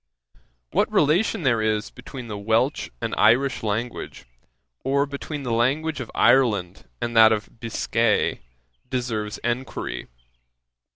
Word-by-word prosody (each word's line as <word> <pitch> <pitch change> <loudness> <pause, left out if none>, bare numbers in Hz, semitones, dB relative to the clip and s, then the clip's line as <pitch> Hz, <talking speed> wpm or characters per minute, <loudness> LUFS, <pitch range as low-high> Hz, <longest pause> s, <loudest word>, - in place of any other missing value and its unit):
'What - - +1
relation 175 +6 +2
there 120 -5 +2
is 110 0 0
between 125 0 -9
the 105 - -5
Welch 110 +7 0
and - - -2
Irish 120 +5 +4
language, 110 +3 -4 0.6
or 140 +1 +2
between 145 +1 -6
the 125 - -3
language 145 +7 +1
of 120 - -6
Ireland 115 - +2
and 120 0 -3
that 110 0 +8
of 110 +1 -3
Biscay, 115 -1 0 0.5
deserves 115 -5 -2
enquiry. 120 +2 -3
120 Hz, 120 wpm, -24 LUFS, 110-135 Hz, 0.6 s, that